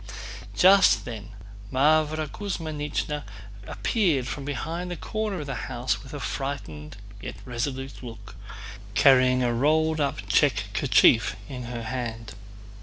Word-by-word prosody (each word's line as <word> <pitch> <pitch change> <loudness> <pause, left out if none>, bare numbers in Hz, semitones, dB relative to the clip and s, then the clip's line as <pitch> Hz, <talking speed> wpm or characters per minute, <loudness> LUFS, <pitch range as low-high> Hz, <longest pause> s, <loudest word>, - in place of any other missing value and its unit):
Just 195 +2 +6
then 110 -3 -7 0.4
Mávra 155 +3 +3
Kuzmínichna 150 -5 -3 0.5
appeared 170 - +1
from 140 +2 -5
behind 165 +6 -3
the 175 - -3
corner 215 -5 -3
of - - -6
the 140 - -4 0.2
house 125 0 -1
with 135 - -12
a 145 - -5
frightened 100 - -5 0.2
yet 100 - -6
resolute 130 +2 -4
look, 115 -3 -10 0.6
carrying 130 +2 +5
a 120 -1 +1
rolled 155 +5 +2
up 130 -8 -2
check 105 -2 +2
kerchief 115 +1 +4
in 125 -3 -6
her 120 -1 -5
hand. 115 -2 -5
135 Hz, 125 wpm, -26 LUFS, 120-155 Hz, 0.6 s, Just